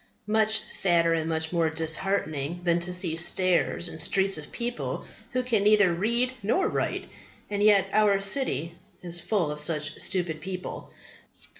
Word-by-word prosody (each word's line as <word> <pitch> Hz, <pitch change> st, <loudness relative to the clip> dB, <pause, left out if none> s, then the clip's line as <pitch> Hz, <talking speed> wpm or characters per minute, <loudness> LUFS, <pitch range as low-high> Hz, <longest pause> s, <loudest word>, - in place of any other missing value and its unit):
Much 220 Hz, 0 st, +2 dB
sadder 170 Hz, -3 st, +4 dB
and 160 Hz, 0 st, -1 dB
much 160 Hz, 0 st, -1 dB
more 165 Hz, -2 st, +2 dB
disheartening 160 Hz, -1 st, -1 dB
than 170 Hz, -1 st, +2 dB
to 175 Hz, +1 st, -2 dB
see 180 Hz, -3 st, -1 dB
stairs 175 Hz, +1 st, +1 dB
and 160 Hz, -1 st, -4 dB
streets 190 Hz, +3 st, +2 dB
of 150 Hz, -1 st, -8 dB
people 240 Hz, 0 st, -4 dB, 0.2 s
who 255 Hz, 0 st, -1 dB
can 235 Hz, -5 st, +1 dB
neither 205 Hz, -4 st, +5 dB
read 235 Hz, +8 st, 0 dB
nor 365 Hz, -, +1 dB
write. -, -, -2 dB, 0.4 s
And 205 Hz, 0 st, -1 dB
yet 205 Hz, -2 st, +5 dB
our 210 Hz, -2 st, +4 dB
city 195 Hz, -, -1 dB, 0.2 s
is 175 Hz, -1 st, -3 dB
full 175 Hz, -6 st, 0 dB
of 150 Hz, -, -6 dB
such 150 Hz, 0 st, -2 dB
stupid 170 Hz, -4 st, -2 dB
people. 185 Hz, +1 st, -6 dB
180 Hz, 155 wpm, -27 LUFS, 165-210 Hz, 0.4 s, neither